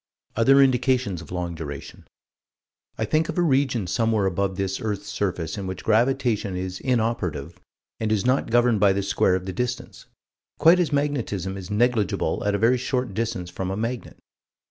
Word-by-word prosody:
Other 135 Hz, +5 st, +5 dB
indications 125 Hz, -7 st, +1 dB
of 85 Hz, -, -13 dB
long 90 Hz, -1 st, -3 dB
duration. 75 Hz, -4 st, -8 dB, 0.9 s
I -, -, -1 dB
think 155 Hz, +1 st, +1 dB
of -, -, -4 dB
a 175 Hz, -, +3 dB
region 135 Hz, -, +1 dB
somewhere 110 Hz, +1 st, +1 dB
above 95 Hz, +1 st, -1 dB
this 95 Hz, -1 st, -2 dB
earth's 105 Hz, -3 st, -3 dB
surface 90 Hz, -3 st, -2 dB
in 95 Hz, -, -5 dB
which 95 Hz, 0 st, -6 dB
gravitation 115 Hz, -3 st, +1 dB
is 90 Hz, 0 st, -4 dB
inoperative 110 Hz, -, -1 dB, 0.4 s
and 110 Hz, -1 st, -1 dB
is 110 Hz, -1 st, +1 dB
not 130 Hz, 0 st, +1 dB
governed 120 Hz, -1 st, +3 dB
by 100 Hz, -1 st, +5 dB
the 100 Hz, 0 st, -1 dB
square 100 Hz, -1 st, +2 dB
of 95 Hz, 0 st, -3 dB
the 95 Hz, -, -4 dB
distance 125 Hz, +4 st, -4 dB, 0.5 s
quite 170 Hz, +3 st, +6 dB
as 175 Hz, -4 st, +1 dB
magnetism 125 Hz, -, -1 dB
is 95 Hz, -2 st, -8 dB
negligible 105 Hz, -2 st, +1 dB
at 100 Hz, -, +2 dB
a -, -, +1 dB
very 115 Hz, +4 st, +3 dB
short 125 Hz, -4 st, -2 dB
distance 110 Hz, -5 st, -3 dB
from 95 Hz, +1 st, -4 dB
a 95 Hz, -, -3 dB
magnet. 115 Hz, +2 st, -4 dB
110 Hz, 175 wpm, -24 LUFS, 95-125 Hz, 0.9 s, quite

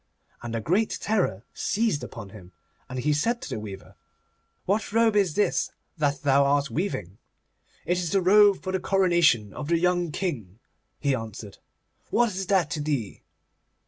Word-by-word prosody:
And 120 Hz, -1 st, -5 dB
a 115 Hz, -, -2 dB
great 190 Hz, -, +1 dB
terror 185 Hz, -, -1 dB
seized 210 Hz, -, 0 dB
upon 105 Hz, -4 st, -8 dB
him, 95 Hz, -3 st, -14 dB, 0.4 s
and 130 Hz, -, -6 dB
he 150 Hz, +4 st, +1 dB
said 230 Hz, +12 st, 0 dB
to -, -, -6 dB
the -, -, -3 dB
weaver, 100 Hz, -2 st, -9 dB, 0.7 s
'What 205 Hz, +4 st, 0 dB
robe 225 Hz, 0 st, +3 dB
is 195 Hz, -6 st, +2 dB
this 210 Hz, -, +1 dB, 0.3 s
that 145 Hz, -3 st, -1 dB
thou 140 Hz, 0 st, +4 dB
art 140 Hz, 0 st, +1 dB
weaving?' 125 Hz, -, -3 dB, 0.7 s
'It 180 Hz, +1 st, +1 dB
is 175 Hz, -2 st, -2 dB
the 195 Hz, -, +2 dB
robe 200 Hz, +1 st, +5 dB
for 185 Hz, -, -3 dB
the 190 Hz, -, 0 dB
coronation 175 Hz, -, +2 dB
of 145 Hz, -, -6 dB
the 170 Hz, +1 st, +2 dB
young 175 Hz, -1 st, +1 dB
King,' 125 Hz, -, -4 dB, 0.4 s
he 140 Hz, -2 st, +1 dB
answered; 110 Hz, -4 st, -6 dB, 0.5 s
'what 240 Hz, 0 st, +3 dB
is 190 Hz, 0 st, -4 dB
that 185 Hz, -6 st, +2 dB
to 155 Hz, -4 st, -2 dB
thee? 140 Hz, -9 st, -3 dB
155 Hz, 170 wpm, -26 LUFS, 120-195 Hz, 0.7 s, robe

